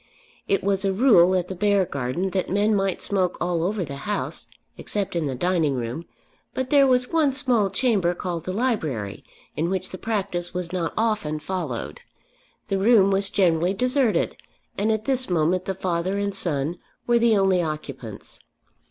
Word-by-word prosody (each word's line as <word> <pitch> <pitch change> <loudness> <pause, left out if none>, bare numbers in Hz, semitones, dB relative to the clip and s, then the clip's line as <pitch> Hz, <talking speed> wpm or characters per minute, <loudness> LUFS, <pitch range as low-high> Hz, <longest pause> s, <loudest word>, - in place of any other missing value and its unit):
It 195 - +1
was 195 0 0
a 195 - +2
rule 190 -5 +5
at 180 -1 0
the 190 - -5
Beargarden 185 -4 0
that 185 -1 -1
men 205 +3 +2
might 195 -2 0
smoke 185 -3 0
all 175 -1 0
over 190 +1 -1
the 140 -1 -7
house 205 - -2 0.3
except 200 -3 -3
in 165 -3 0
the 135 - -3
dining 165 -1 +1
room; 125 +7 -4 0.5
but 260 0 -3
there 280 -2 +6
was 250 -1 +2
one 305 -4 +3
small 245 -7 +2
chamber 195 -8 +1
called 170 -2 -4
the 185 - -2
library, 160 - -2 0.3
in 165 +3 -1
which 185 0 -3
the 185 - -7
practice 195 -6 -3
was 180 -1 -3
not 170 -3 -2
often 210 -9 0
followed. 150 - -4 0.7
The 195 - 0
room 200 -2 +5
was 195 0 +2
generally 180 -2 +2
deserted, 250 0 +1 0.4
and 210 +3 +1
at 220 0 -1
this 260 -3 0
moment 175 +2 +1
the 190 - -2
father 185 +1 -1
and 200 0 -1
son 170 -3 0 0.3
were 240 -1 +3
the 230 -2 +4
only 190 -2 +3
occupants. 140 - -6
190 Hz, 170 wpm, -24 LUFS, 170-210 Hz, 0.7 s, there